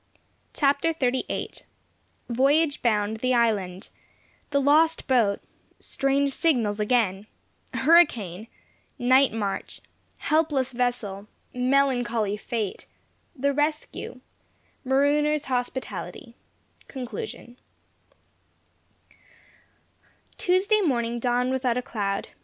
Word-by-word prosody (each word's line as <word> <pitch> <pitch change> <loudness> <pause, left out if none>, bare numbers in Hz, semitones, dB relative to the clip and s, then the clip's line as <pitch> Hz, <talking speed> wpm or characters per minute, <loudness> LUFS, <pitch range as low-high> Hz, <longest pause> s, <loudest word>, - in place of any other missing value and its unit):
CHAPTER 285 +3 +2
XXXVIII 260 -3 -1 0.7
VOYAGE 280 +5 +2
BOUND 215 -2 +1
THE 255 +2 +1
ISLAND 200 -6 0 0.6
THE 280 - +2
LOST 310 +4 +3
BOAT 230 -7 +2 0.4
STRANGE 275 +1 0
SIGNALS 235 -10 +1
AGAIN 210 -3 +1 0.5
HURRICANE 235 - +3 0.5
NIGHT 260 +2 +4
MARCH 205 -3 -3 0.4
HELPLESS 300 -5 +1
VESSEL 235 -5 -2 0.3
MELANCHOLY 250 -5 +1
FATE 215 -2 -4 0.5
THE 280 +1 0
RESCUE 295 -3 -3 0.6
MAROONERS' 290 +3 +2
HOSPITALITY 250 -1 -4 0.5
CONCLUSION 245 -1 -7 2.8
Tuesday 395 +4 +2
morning 240 - 0
dawned 245 +1 +1
without 255 -2 0
a 250 - -2
cloud. 200 -4 -3
250 Hz, 80 wpm, -25 LUFS, 225-280 Hz, 2.8 s, NIGHT